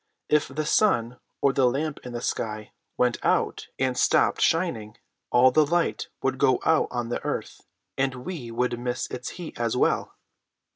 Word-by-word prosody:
If 150 0 +3
the 150 +3 -3
sun, 125 - +2 0.2
or 140 - +3
the 135 -2 +3
lamp 140 +4 -1
in 125 - -7
the 120 - -5
sky, 110 -1 -3 0.3
went 125 -1 +1
out - - +1
and 130 -1 0
stopped - - +3
shining, 115 -11 0 0.3
all 125 +1 +5
the 155 +4 +5
light 170 +3 0 0.2
would 135 0 0
go 135 -2 +4
out 160 -1 +3
on 120 -1 -3
the 120 - -3
earth, - - -5 0.3
and 130 -2 -1
we 155 -11 -5
would 120 +1 -1
miss 125 0 -2
its 125 0 -5
heat 175 -8 -8
as 120 0 0
well. - - +1
125 Hz, 175 wpm, -26 LUFS, 120-150 Hz, 0.3 s, all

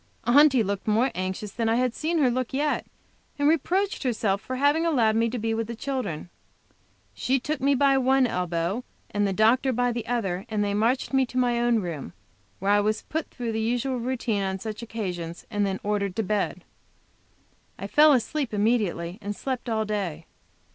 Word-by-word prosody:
Aunty 270 -1 +5
looked 200 0 -3
more 230 +5 +2
anxious 185 +2 -4
than 225 +1 -1
I 225 - +3
have 250 0 +1
seen 330 +5 -1
her 270 -5 +3
look 255 +1 -2
yet, 295 +2 0 0.5
and 285 0 +2
reproached 360 +6 +1
herself 215 -6 0
for 255 - -5
having 285 +5 +3
allowed 240 -10 +2
me 230 +1 +2
to 245 - -3
be 225 0 -1
with 225 -1 -2
the 235 - -5
children. 220 - -4 0.8
She 265 +1 0
took 300 +2 -3
me 280 +1 +3
by 275 0 +4
one 265 0 +3
elbow, 180 +2 -1 0.3
and 205 0 +1
the - - 0
doctor 230 +7 +3
by 245 0 +1
the 235 -1 -4
other, 200 -4 -2
and 210 -2 0
they 200 0 -1
marched 230 +7 +1
me 265 - +4
off 260 - +1
to 255 - -6
my 245 -1 +2
own 240 -2 +2
room, 155 - -5 0.4
where 195 +2 0
I 205 - +5
was 215 +1 0
put 320 0 -4
through 240 -3 -4
the 220 0 -1
usual 245 +3 -1
routine 235 -4 -1
on 190 -1 -1
such 215 +3 -6
occasions, 180 -7 -5
and 205 -2 +1
then 190 -1 -2
ordered 200 -2 -1
to 225 - 0
bed. 210 +1 -1 1.1
I - - -6
fell 300 +1 +6
asleep 260 -1 0
immediately 200 -5 0
and 205 +1 -4
slept 255 0 -4
all 220 -1 0
day. 190 -7 -3
230 Hz, 195 wpm, -26 LUFS, 205-260 Hz, 1.1 s, fell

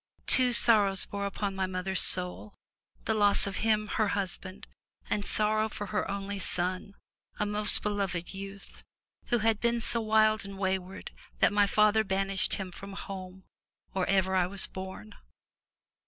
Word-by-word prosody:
Two 255 -1 +4
sorrows 210 -5 +4
bore 200 0 -4
upon 200 0 -3
my 190 -1 -2
mother's 185 +1 0
soul, 180 +3 0 0.5
the 220 - +1
loss 205 -2 +3
of 195 -1 -4
him, 215 -1 +1
her 215 +1 0
husband, 195 -1 -4 0.5
and 205 - 0
sorrow 215 +1 0
for 205 - -6
her 210 - -1
only 200 0 -4
son, 185 +2 -3 0.4
a 210 - 0
most 210 0 +4
beloved 195 -4 -2
youth, 195 0 -10 0.4
who 240 - +2
had 225 -1 +1
been 235 0 +2
vSO 230 0 -2
wild 215 0 +3
and 200 0 -9
wayward 190 -1 -3 0.3
that - - +3
my 205 -1 +4
father 215 +1 +3
banished 195 -1 0
him 190 -2 -6
from 195 +2 -10
home 190 -2 -8 0.5
or 190 -1 -1
ever 190 -1 +1
I 180 -1 +2
was 195 +1 +3
born. 190 - -9
200 Hz, 155 wpm, -29 LUFS, 190-210 Hz, 0.5 s, Two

